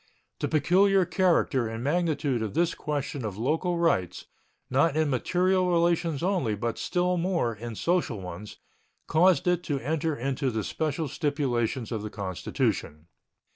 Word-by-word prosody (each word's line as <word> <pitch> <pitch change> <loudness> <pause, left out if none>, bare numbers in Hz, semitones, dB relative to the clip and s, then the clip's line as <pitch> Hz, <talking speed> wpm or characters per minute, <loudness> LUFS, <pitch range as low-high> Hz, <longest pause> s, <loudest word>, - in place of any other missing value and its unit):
The - - -1
peculiar 185 +5 +3
character 170 - +2
and 115 +1 -5
magnitude 150 -5 0
of 110 -3 -4
this 170 0 +2
question 145 -3 -3
of 105 -3 -4
local 160 - 0
rights, 95 - 0 0.4
not 140 +4 +2
in 155 -2 +2
material 185 +7 +1
relations 170 -3 +1
only, 175 - +1
but 115 +3 -3
still 180 0 0
more 170 -9 0
in 115 +2 -7
social 165 - 0
ones, 90 +3 -8 0.5
caused 180 +2 +3
it 180 -1 +2
to 145 - -1
enter 155 +3 -1
into 135 +1 -1
the 110 -3 -2
special 155 - -2
stipulations 130 -5 -1
of 110 -3 -2
the 105 - -5
Constitution. 90 -5 -3
145 Hz, 145 wpm, -27 LUFS, 115-170 Hz, 0.5 s, peculiar